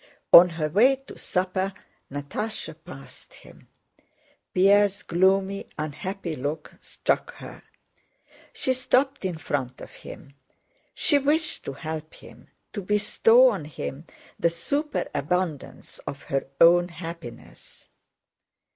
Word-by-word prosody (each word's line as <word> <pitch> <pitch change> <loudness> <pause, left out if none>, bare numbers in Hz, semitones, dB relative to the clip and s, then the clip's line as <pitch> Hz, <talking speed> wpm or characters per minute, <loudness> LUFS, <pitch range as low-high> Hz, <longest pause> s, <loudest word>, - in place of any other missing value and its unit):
On 180 +1 +11
her 160 -2 -2
way 230 - +4
to 270 0 -14
supper 190 +1 -2 0.4
Natásha 155 +5 -5
passed 135 -7 -13
him. - - -17 0.8
Pierre's 200 +2 +4
gloomy, 190 +3 +1
unhappy 170 +4 -4
look 145 +3 -5
struck - - -2
her. - - -11 0.9
She 260 - -1
stopped 255 -1 +1
in 180 -3 -2
front 135 -5 -3
of - - -10
him. 140 - -12 0.6
She 290 -4 +3
wished 305 +3 0
to 140 - -4
help 155 +2 -6
him, - - -15 0.3
to 205 - -4
bestow 215 +5 +4
on 190 -9 -5
him 150 0 -7 0.3
the 170 - +3
superabundance 180 - -3
of 140 - -6
her 135 -1 -2
own 175 +1 +6
happiness. 165 -7 -11
180 Hz, 110 wpm, -25 LUFS, 155-210 Hz, 0.9 s, On